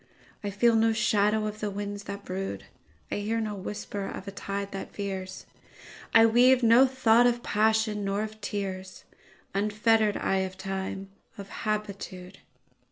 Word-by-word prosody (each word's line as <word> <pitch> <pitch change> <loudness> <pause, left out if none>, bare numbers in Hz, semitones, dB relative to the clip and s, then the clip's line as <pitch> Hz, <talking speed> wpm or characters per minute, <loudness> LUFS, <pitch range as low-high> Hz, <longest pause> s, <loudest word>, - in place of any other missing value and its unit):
I 205 - -2
feel 225 +4 +3
no 225 0 +4
shadow 215 -1 +2
of 215 0 -4
the 210 - -2
winds 205 0 -5
that 200 0 -7
brood,I 100 - -7
hear 215 +3 -1
no 215 -2 -2
whisper 200 0 -5
of 195 - -7
a - - -4
tide 200 0 -4
that 195 - -6
veers,I 195 +3 -2
weave 250 +3 +5
no 235 +4 +7
thought 245 -2 +4
of 240 0 0
passion, 215 0 +1
nor 200 +1 -1
of 215 0 -8
tears, 190 -2 -5 0.5
Unfettered 210 +1 +2
I 195 - 0
of 190 0 -2
time, 195 0 -4 0.3
of 200 -1 -8
habitude. 200 -4 -4
205 Hz, 145 wpm, -28 LUFS, 195-220 Hz, 0.5 s, no